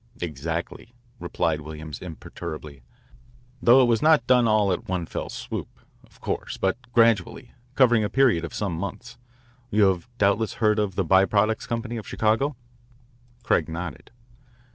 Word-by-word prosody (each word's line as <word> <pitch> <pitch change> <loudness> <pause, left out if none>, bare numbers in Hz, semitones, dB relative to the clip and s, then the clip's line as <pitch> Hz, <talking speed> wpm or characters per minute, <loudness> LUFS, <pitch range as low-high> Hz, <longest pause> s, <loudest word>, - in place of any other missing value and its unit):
"Exactly," 85 - -5 0.2
replied 80 -2 -1
Williams 75 -1 -8
imperturbably, 75 -4 -8 0.8
"though 125 +3 +6
it - - +5
was 115 -2 +2
not 155 -1 +4
done 125 -2 +4
all 105 -3 +3
at 90 - -3
one 90 -2 -2
fell - - -5
swoop, - - -5 0.4
of - - -23
course, - - -4
but 95 +2 0 0.2
gradually, 115 +1 +2 0.2
covering 120 -4 +4
a 105 - -1
period 120 -8 +3
of 85 - -5
some 100 -4 -3
months. 105 +8 -6 0.5
You 105 -3 +3
have 95 +4 -3
doubtless 100 +2 +1
heard 105 -1 +2
of 100 -3 -1
the 95 - 0
By 95 +3 +5
Products 105 +2 0
Company 115 0 -3
of 110 - -8
Chicago?" 115 +7 0 0.9
Craig - - +1
nodded. 85 -2 -6
105 Hz, 150 wpm, -24 LUFS, 85-115 Hz, 0.9 s, though